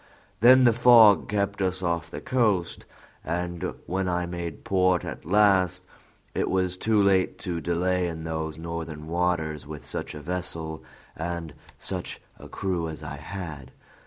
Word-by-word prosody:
Then 130 +3 +7
the 120 -2 +6
fog 115 -4 +7
kept 100 -1 -1
us 95 0 -1
off 85 -1 -1
the - - -7
coast; 105 -9 0 0.4
and 85 0 -3
when 95 +1 -1
I 90 0 0
made 85 -3 -6
port 95 -2 +2
at - - -7
last, 95 -1 +3 0.5
it - - -1
was 95 -1 +1
too 110 +3 +1
late 95 -2 +3
to 85 -2 -2
delay 90 +2 0
in 80 -1 -5
those 80 -1 -4
northern 80 -2 -6
waters 80 -3 -1
with 75 -1 -8
such - - -4
a - - -6
vessel 80 -2 -4 0.3
and 85 -1 -4 0.2
such - - -5 0.2
a - - -11
crew 90 -4 -2
as 80 - -8
I - - -6
had. 80 -9 -7
90 Hz, 155 wpm, -26 LUFS, 80-95 Hz, 0.5 s, Then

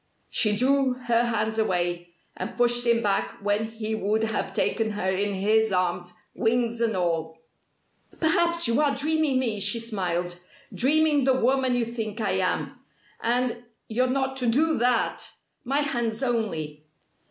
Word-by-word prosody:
She 210 -2 +2
drew 265 +2 +3
her 240 -1 +1
hands 220 -1 -1
away, 175 -4 -1 0.2
and - - -6
pushed 240 0 +2
him 235 0 +3
back 200 -2 0
when 205 +2 0
he 220 -1 -4
would 220 +1 0
have 220 -1 -2
taken 225 -1 0
her 205 -2 -3
in 200 +1 0
his 215 +3 +2
arms, 180 -1 -1 0.2
wings 235 0 0
and 225 -4 +1
all. 165 -2 -1 0.8
"Perhaps 340 0 +2
you 235 +5 +2
are 285 -2 +2
dreaming 305 -1 +1
me!" 230 -5 0
she 230 - 0
smiled, 180 -6 -2 0.3
"Dreaming 295 +1 +3
the 260 -1 +3
woman 260 0 +2
you 240 -1 +1
think 225 -2 -5
I 220 - 0
am. - - -1 0.4
And 240 0 0 0.3
you're 250 +3 +1
not 265 +1 -1
to 250 -2 -1
do 310 +6 +2
that! 245 0 0 0.3
My 275 +3 +1
hands 240 -4 -2
only!" 165 - -2
230 Hz, 155 wpm, -25 LUFS, 205-255 Hz, 0.8 s, drew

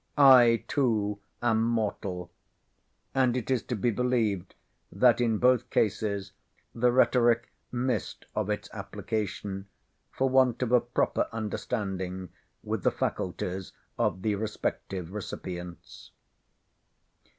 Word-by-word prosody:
"I 125 -5 +7
too 105 -7 +1 0.2
am 110 -2 +3
mortal." 100 -6 -2 0.8
And 130 -2 +2
it 125 +1 -3
is 130 -3 +2
to 125 - -2
be 115 +3 +1
believed 110 -6 0 0.4
that 125 -1 +4
in 115 -2 +2
both 125 +1 +3
cases 100 -2 0 0.4
the 120 +1 +3
rhetoric 120 -2 +3 0.2
missed 125 0 -2
of 105 -1 -1
its 105 - -2
application, 100 -1 -4 0.4
for 135 - 0
want 130 -2 +3
of 120 - -2
a 125 -1 +6
proper 120 +1 0
understanding 95 -4 -3 0.3
with - - -2
the - - +3
faculties 90 +1 -3 0.2
of 95 - 0
the 110 - +1
respective 100 -4 -3
recipients. 90 -4 -7
110 Hz, 115 wpm, -28 LUFS, 100-120 Hz, 0.8 s, I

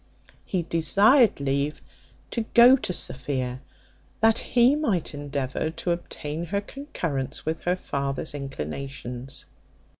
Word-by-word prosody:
He 185 -3 -1
desired 200 - +4
leave 140 +2 -1 0.5
to 235 - -1
go 245 +2 +9
to 250 - -3
Sophia, 130 -5 -2 0.6
that 225 +1 +5
he 250 +3 +4
might 220 - 0
endeavour 145 0 -2
to 170 +2 -3
obtain 165 -1 -4
her 200 +4 -1
concurrence 180 - -4
with 160 +1 -2
her 180 +1 +2
father's 140 -4 -3
inclinations. 135 - -6
155 Hz, 115 wpm, -26 LUFS, 135-205 Hz, 0.6 s, go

